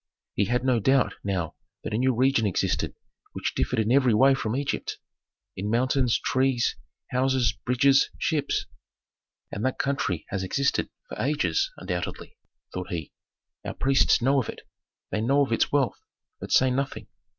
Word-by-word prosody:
He 100 - +1
had 125 +4 0
no 125 -3 +3
doubt 135 +5 +3
now 90 -5 -2 0.3
that - - -4
a - - +1
new 130 0 +2
region 130 -2 +3
existed 95 - -1 0.4
which - - -3
differed 125 - -1
in 110 +1 +1
every 130 -4 +4
way 135 +4 +6
from 115 -4 -2
Egypt: 140 +1 -2 0.6
in 100 +3 -3
mountains, 125 +1 +2
trees, 130 -2 +1 0.4
houses, 130 -3 +2 0.2
bridges, 135 +2 +4
ships. 150 -3 0 0.9
"And 100 - -4
that 130 - 0
country 135 - -1
has 95 - -2
existed 140 +9 0 0.2
for - - -6
ages 150 - +1
undoubtedly," - - -5 0.4
thought 90 0 -5
he; 80 -4 -4 0.5
"our - - -5
priests 135 -2 +3
know 135 +2 +4
of 115 - -7
it, - - -7 0.5
they 105 - -1
know 140 +5 +3
of 130 - -10
its 115 - +1
wealth, 140 -3 +1 0.4
but - - -7
say 130 0 +5
nothing. 135 +1 -2
130 Hz, 160 wpm, -26 LUFS, 110-135 Hz, 0.9 s, way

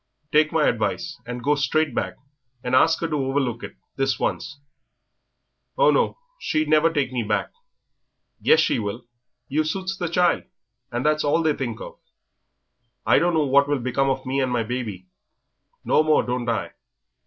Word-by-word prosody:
"Take 155 0 +4
my 160 -2 +2
advice, 120 - -2
and 125 0 -5
go 145 +4 +3
straight 145 0 +1
back - - -2 0.5
and 125 - -3
ask 160 +6 +4
'er - - +1
to 155 - -1
overlook 130 -3 -1
it, - - -8 0.2
this 135 -3 0
once." 140 - -3 1.2
"Oh, - - +5
no, - - +1 0.2
she'd 155 -1 0
never 155 +2 +4
take 140 -5 -1
me 125 -2 -1
back." 105 -1 -1 0.9
"Yes, 465 - +5
she - - +1
will; 110 +3 -5 0.4
you 155 +3 +1
suits 185 +4 -3
the 175 -3 -3
child, 175 +1 +2 0.5
and 120 +3 -3
that's 155 0 +2
all 155 +3 +2
they 155 -1 +3
think 120 -5 -4
of." - - -9 1.1
"I - - +5
don't 175 +2 +1
know 155 -2 +2
what 140 +1 +4
will 145 0 +1
become 130 +2 0
of 135 0 -2
me 135 +2 0
and 130 -1 0
my 120 -2 +1
baby." 110 -6 -5 0.8
"No - - +4
more 155 0 +3
don't 125 -1 -2
I. 115 - -2
140 Hz, 175 wpm, -23 LUFS, 125-155 Hz, 1.2 s, Oh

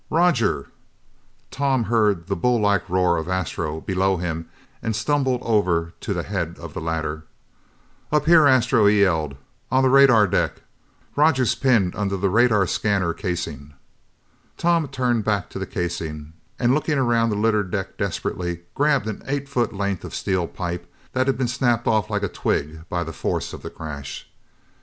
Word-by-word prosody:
Roger!" 155 - +2 0.8
Tom 135 -3 +1
heard 105 -6 +1
the - - -2
bull 120 +7 +2
like 100 -4 +1
roar 90 -1 +2
of 80 +2 -4
Astro 85 -4 -2
below 95 0 +1
him 80 -1 -4 0.3
and 110 -1 -2
stumbled 130 +1 0
over 90 -7 +1
to - - -5
the - - -1
head 90 -4 -3
of 85 -3 -9
the 95 - -5
ladder. 80 -1 -3 0.9
"Up 150 -1 +2
here, 160 -2 +7
Astro," 125 -4 +4
he 105 0 +4
yelled, 80 -7 +1 0.4
"on 130 0 +3
the 130 - +4
radar 135 -6 +7
deck. 100 - -1 0.5
Roger's 145 -5 +3
pinned 115 -9 +2
under 100 -1 -1
the 95 0 0
radar 110 -2 +4
scanner 95 -2 0
casing!" 80 -7 -5 0.8
Tom 170 -3 +2
turned 125 -4 0
back 100 -3 -1
to - - -6
the - - -4
casing, 80 -3 -4 0.2
and 120 +1 +2
looking 150 0 0
around 120 -3 +2
the 105 - -1
littered 105 -2 +1
deck 95 0 -4
desperately, 85 -1 -3
grabbed 140 -6 +2
an 110 -2 -5
eight 140 0 -2
foot 125 -5 0
length 100 -2 -2
of - - -7
steel 95 -3 -1
pipe 85 -1 -5 0.2
that 130 +1 +1
had 135 - +1
been 130 -1 0
snapped 120 -2 +1
off 110 -1 +1
like 105 -1 -1
a - - +1
twig 80 0 -3
by 85 -1 -1
the 80 0 -7
force - - -3
of - - -8
the - - -6
crash. 75 -3 -7
100 Hz, 170 wpm, -23 LUFS, 85-125 Hz, 0.9 s, here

